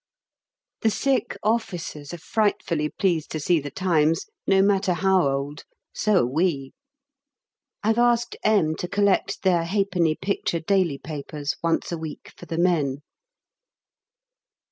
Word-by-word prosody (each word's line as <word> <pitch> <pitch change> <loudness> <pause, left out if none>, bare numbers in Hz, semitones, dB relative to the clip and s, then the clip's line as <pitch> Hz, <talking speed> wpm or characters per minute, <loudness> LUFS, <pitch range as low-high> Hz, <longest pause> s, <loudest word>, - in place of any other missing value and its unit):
The 225 - +3
sick 270 +4 0
officers 180 -9 -2
are 175 - -6
frightfully 170 -5 0
pleased 170 -5 0
to 155 - -2
see 170 +3 +2
'The 145 0 -6
Times,' 165 -2 +1 0.2
no 195 0 +5
matter 195 -2 +2
how 190 -2 +3
old; 140 +2 -3 0.3
so 210 -4 +2
are - - +2
we. 140 0 0 1.1
I've 220 +2 +2
asked 240 0 +2
M. 205 -8 +3
to 180 - -4
collect 200 +1 +1
their 180 -3 +3
1/2d. 180 -3 0
picture 190 -3 -1
daily 175 -3 +1
papers 145 0 -5
once 165 +1 0
a 170 - -3
week 160 -1 -8
for - - -12
the 165 - -4
men. 150 -6 +1
175 Hz, 135 wpm, -24 LUFS, 155-200 Hz, 1.1 s, no